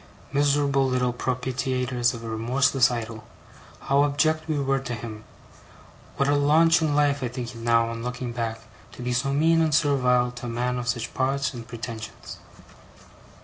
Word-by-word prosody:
Miserable 140 Hz, -1 st, +2 dB
little 125 Hz, -1 st, 0 dB
propitiators 125 Hz, 0 st, -1 dB
of 115 Hz, -, -9 dB
a -, -, -6 dB
remorseless 125 Hz, +4 st, +2 dB
Idol, 115 Hz, -2 st, -5 dB, 0.6 s
how 140 Hz, +1 st, +3 dB
abject 155 Hz, +2 st, +1 dB
we 155 Hz, -2 st, -1 dB
were 135 Hz, -1 st, +1 dB
to 125 Hz, -2 st, -5 dB
him! 110 Hz, -1 st, -8 dB, 0.9 s
What 140 Hz, -, +2 dB
a 145 Hz, -, +3 dB
launch 155 Hz, +3 st, +4 dB
in 150 Hz, -2 st, +1 dB
life 145 Hz, -1 st, +2 dB
I 125 Hz, -, -1 dB
think 120 Hz, 0 st, -6 dB
it -, -, -11 dB
now, 115 Hz, 0 st, +2 dB
on 115 Hz, 0 st, -5 dB
looking 125 Hz, 0 st, -4 dB
back, 115 Hz, -1 st, -3 dB, 0.3 s
to 125 Hz, -, -9 dB
be 125 Hz, 0 st, -1 dB
so 135 Hz, +3 st, 0 dB
mean 165 Hz, +3 st, +3 dB
and 155 Hz, -2 st, +2 dB
servile 125 Hz, -5 st, +2 dB
to 125 Hz, 0 st, -8 dB
a -, -, -4 dB
man 125 Hz, +1 st, -1 dB
of 120 Hz, -, -5 dB
such 120 Hz, -1 st, -2 dB
parts 135 Hz, +1 st, 0 dB
and 120 Hz, -2 st, -8 dB
pretensions! 115 Hz, -2 st, -8 dB
125 Hz, 175 wpm, -25 LUFS, 120-140 Hz, 0.9 s, launch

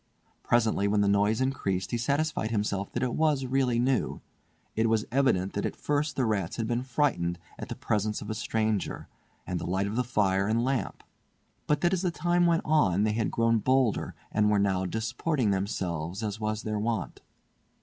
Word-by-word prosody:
Presently, 110 Hz, -4 st, +2 dB
when 105 Hz, 0 st, +2 dB
the 100 Hz, -, +2 dB
noise 105 Hz, +3 st, +2 dB
increased, 100 Hz, -9 st, -1 dB
he 120 Hz, -, 0 dB
satisfied 140 Hz, -1 st, 0 dB
himself 105 Hz, -3 st, -1 dB
that -, -, -1 dB
it 125 Hz, -, -1 dB
was 150 Hz, -4 st, +1 dB
really 130 Hz, -2 st, +1 dB
new. 125 Hz, +1 st, +1 dB, 0.6 s
It 110 Hz, +1 st, +2 dB
was 110 Hz, -1 st, +1 dB
evident 120 Hz, -8 st, +2 dB
that 100 Hz, -, -2 dB
at -, -, -2 dB
first 145 Hz, -1 st, -1 dB
the 130 Hz, -, +1 dB
rats 100 Hz, -6 st, -1 dB
had 115 Hz, -, -2 dB
been 120 Hz, +1 st, 0 dB
frightened 120 Hz, -10 st, 0 dB, 0.2 s
at -, -, -6 dB
the -, -, -4 dB
presence 105 Hz, 0 st, -1 dB
of 105 Hz, -, -8 dB
a 110 Hz, -, -2 dB
stranger, 110 Hz, -2 st, -1 dB, 0.4 s
and 90 Hz, -1 st, -2 dB
the -, -, -5 dB
light 95 Hz, +2 st, 0 dB
of 110 Hz, +5 st, -1 dB
fire 100 Hz, -4 st, +2 dB
and 115 Hz, +2 st, +1 dB
lamp; 130 Hz, -2 st, -2 dB, 0.6 s
but 150 Hz, 0 st, +1 dB
that 175 Hz, +1 st, +2 dB
as 185 Hz, -, +1 dB
the 185 Hz, -, +1 dB
time 175 Hz, +1 st, +2 dB
went 165 Hz, -1 st, +2 dB
on 105 Hz, -, +3 dB
they 110 Hz, 0 st, +1 dB
had 110 Hz, 0 st, 0 dB
grown 115 Hz, 0 st, +2 dB
bolder 130 Hz, -1 st, +1 dB, 0.2 s
and 105 Hz, 0 st, +2 dB
were 105 Hz, -, +3 dB
now 95 Hz, -2 st, +1 dB
disporting 110 Hz, -, -1 dB
themselves 95 Hz, -2 st, -2 dB
as 105 Hz, 0 st, -3 dB
was 110 Hz, 0 st, -2 dB
their 105 Hz, -1 st, -2 dB
wont. 110 Hz, -3 st, -2 dB
110 Hz, 190 wpm, -28 LUFS, 100-130 Hz, 0.6 s, on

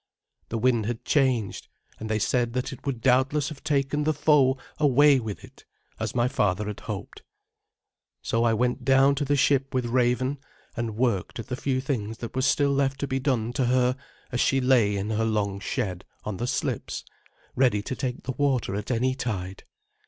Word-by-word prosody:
The 115 Hz, -, -2 dB
wind 115 Hz, -2 st, +2 dB
had 120 Hz, -1 st, -4 dB
changed, 130 Hz, -8 st, +1 dB, 0.3 s
and 110 Hz, -, -6 dB
they 110 Hz, -, +1 dB
said 120 Hz, +4 st, 0 dB
that 130 Hz, +3 st, -2 dB
it 130 Hz, -, -11 dB
would 125 Hz, -4 st, -2 dB
doubtless 130 Hz, +4 st, +2 dB
have 150 Hz, -3 st, -10 dB
taken 145 Hz, 0 st, 0 dB
the 155 Hz, 0 st, +1 dB
foe 140 Hz, -3 st, +4 dB, 0.2 s
away 145 Hz, -1 st, +5 dB
with 110 Hz, -4 st, -6 dB
it, -, -, -15 dB, 0.4 s
as -, -, -3 dB
my 120 Hz, 0 st, +3 dB
father 105 Hz, -7 st, 0 dB
had 105 Hz, -1 st, -5 dB
hoped. -, -, -7 dB, 1.0 s
So 115 Hz, +1 st, +1 dB
I 115 Hz, -, +3 dB
went 125 Hz, +2 st, 0 dB
down 135 Hz, +1 st, +5 dB
to 140 Hz, +1 st, -1 dB
the 145 Hz, +1 st, +2 dB
ship 135 Hz, -1 st, +2 dB
with 125 Hz, -1 st, +1 dB
Raven, 125 Hz, +3 st, +1 dB, 0.4 s
and 115 Hz, -2 st, -3 dB
worked 115 Hz, -7 st, 0 dB
at 115 Hz, +1 st, -7 dB
the 125 Hz, -, -1 dB
few 130 Hz, 0 st, -1 dB
things 115 Hz, -5 st, -3 dB
that 115 Hz, 0 st, -7 dB
were 130 Hz, -, +1 dB
still 140 Hz, +1 st, +3 dB
left 135 Hz, -1 st, 0 dB
to 140 Hz, -, -1 dB
be 135 Hz, 0 st, -1 dB
done 125 Hz, -4 st, 0 dB
to 130 Hz, -, +1 dB
her 125 Hz, 0 st, +2 dB, 0.4 s
as 125 Hz, -, -2 dB
she 135 Hz, -, +3 dB
lay 120 Hz, -6 st, +3 dB
in 100 Hz, +3 st, -3 dB
her 110 Hz, +1 st, 0 dB
long 105 Hz, -3 st, 0 dB
shed 95 Hz, -5 st, -3 dB, 0.2 s
on 105 Hz, -3 st, -4 dB
the 120 Hz, -, -2 dB
slips, -, -, -2 dB, 0.5 s
ready 125 Hz, -6 st, +2 dB
to 130 Hz, -, -4 dB
take 125 Hz, -2 st, -4 dB
the 130 Hz, -, -3 dB
water 130 Hz, -6 st, 0 dB
at 105 Hz, +1 st, -4 dB
any 130 Hz, +1 st, +1 dB
tide. 95 Hz, -8 st, -4 dB
125 Hz, 195 wpm, -26 LUFS, 110-135 Hz, 1.0 s, away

